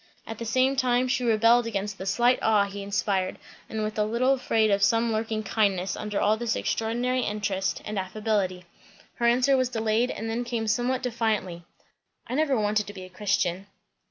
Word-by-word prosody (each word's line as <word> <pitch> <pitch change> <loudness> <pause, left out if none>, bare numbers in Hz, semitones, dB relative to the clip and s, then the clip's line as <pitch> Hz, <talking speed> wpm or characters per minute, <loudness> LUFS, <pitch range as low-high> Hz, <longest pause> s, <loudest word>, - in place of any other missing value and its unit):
At 225 - -7
the 230 - -4
same 260 +4 +2
time 255 -1 +2
she 250 0 0
rebelled 230 +1 +4
against 205 -2 -3
the 190 - -5
slight 240 +5 +3
awe 215 -2 +4
he 200 0 -7
inspired, 200 -1 -1 0.3
and 220 -1 -3
was 215 0 -3
a - - +4
little 235 +5 +2
afraid 225 -5 +1
of 200 0 +2
some 230 +3 +3
lurking 220 0 -2
"kindness" 195 -3 0
under 210 -1 -3
all 215 +1 +2
this 235 -1 -1
extraordinary 240 +3 -1
interest 205 -3 -2
and 210 -1 -3
affability. 190 -2 -2 0.5
Her 235 - +2
answer 255 +3 +4
was 255 -1 +1
delayed 225 +1 0
and 225 - -5
then 230 +2 -2
came 235 -2 -3
somewhat 245 +4 0
defiantly. 215 -8 -2 0.6
"I 240 - -6
never 285 -2 +2
wanted 210 0 0
to 205 - -7
be 190 -2 -9
a 185 - -10
Christian." 190 -1 -1
220 Hz, 185 wpm, -26 LUFS, 200-240 Hz, 0.6 s, rebelled